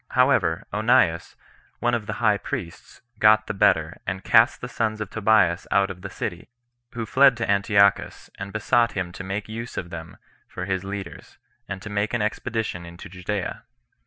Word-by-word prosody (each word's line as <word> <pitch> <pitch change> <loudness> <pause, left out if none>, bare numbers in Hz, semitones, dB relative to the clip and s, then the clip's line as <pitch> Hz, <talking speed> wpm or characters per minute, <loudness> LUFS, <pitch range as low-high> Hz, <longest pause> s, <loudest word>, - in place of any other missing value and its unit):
However, 95 -10 +3
Onias, 105 -6 +2 0.4
one 120 0 0
of 115 -3 -2
the 105 - -3
high 105 -3 +2
priests, 110 - -7 0.2
got 110 0 +5
the - - -4
better, 100 - +2
and 95 +1 -3
cast 115 0 +4
the 125 - -6
sons 110 -3 -2
of 105 - -5
Tobias 110 -5 +2
out 100 0 +2
of 90 -1 -10
the 100 - -6
city; 85 -2 -6 0.4
who 115 -1 -4
fled 135 +2 +5
to 120 - -2
Antiochus, 100 0 +2
and 100 0 -6
besought 115 +2 +2
him 95 -2 -3
to 95 - -8
make 100 +1 -4
use 115 +2 -7
of 85 -1 -5
them 80 0 -8 0.3
for 90 - -6
his 95 -1 -2
leaders, 100 0 -8 0.3
and 95 -1 -6
to 105 - -7
make 105 +3 -1
an 120 - 0
expedition 110 -4 -3
into 85 0 -11
Judea. 95 +2 -4
105 Hz, 180 wpm, -24 LUFS, 95-110 Hz, 0.4 s, got